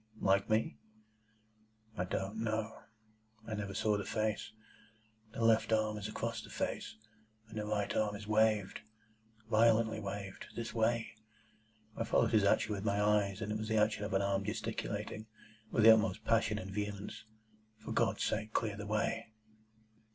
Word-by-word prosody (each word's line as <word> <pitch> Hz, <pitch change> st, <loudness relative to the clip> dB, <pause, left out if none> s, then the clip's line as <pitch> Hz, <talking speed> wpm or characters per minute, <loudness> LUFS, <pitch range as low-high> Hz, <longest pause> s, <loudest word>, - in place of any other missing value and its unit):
"Like 100 Hz, 0 st, +2 dB
me?" 110 Hz, +1 st, +1 dB, 1.2 s
"I 90 Hz, -, -1 dB
don't 95 Hz, +3 st, -3 dB
know. 110 Hz, 0 st, -2 dB, 0.7 s
I 110 Hz, -, -4 dB
never 100 Hz, -2 st, -4 dB
saw 105 Hz, -1 st, +2 dB
the 100 Hz, -, -3 dB
face. 110 Hz, -1 st, -2 dB, 0.8 s
The 115 Hz, -, -1 dB
left 115 Hz, 0 st, +4 dB
arm 110 Hz, -1 st, +2 dB
is 105 Hz, -, -4 dB
across 115 Hz, +1 st, -3 dB
the -, -, -12 dB
face, -, -, -3 dB, 0.5 s
and 110 Hz, 0 st, -6 dB
the 105 Hz, -, -3 dB
right 105 Hz, -1 st, -1 dB
arm 105 Hz, -1 st, +1 dB
is 105 Hz, +1 st, -8 dB
waved,—violently 110 Hz, +1 st, +1 dB
waved. 100 Hz, -1 st, -6 dB
This 115 Hz, -1 st, -4 dB
way." 115 Hz, 0 st, +1 dB, 0.8 s
I -, -, -1 dB
followed 115 Hz, -, +2 dB
his 110 Hz, -3 st, +4 dB
action 105 Hz, +1 st, +3 dB
with 100 Hz, -1 st, -4 dB
my 100 Hz, -1 st, +1 dB
eyes, 105 Hz, -1 st, +2 dB
and 105 Hz, -, -3 dB
it 105 Hz, -, -1 dB
was 110 Hz, -, -4 dB
the 110 Hz, 0 st, +1 dB
action 105 Hz, -1 st, +2 dB
of 105 Hz, -1 st, -2 dB
an 95 Hz, -, +2 dB
arm 100 Hz, 0 st, +1 dB
gesticulating, 110 Hz, +2 st, -4 dB, 0.4 s
with 110 Hz, -, +2 dB
the 110 Hz, 0 st, +11 dB
utmost 110 Hz, -1 st, 0 dB
passion 115 Hz, -2 st, +2 dB
and 95 Hz, -2 st, -6 dB
vehemence, 105 Hz, +1 st, -4 dB, 0.6 s
"For -, -, -4 dB
God's -, -, +1 dB
sake, 110 Hz, 0 st, -1 dB
clear 110 Hz, -3 st, 0 dB
the 105 Hz, 0 st, -6 dB
way!" 115 Hz, +2 st, -1 dB
110 Hz, 160 wpm, -34 LUFS, 105-110 Hz, 1.2 s, the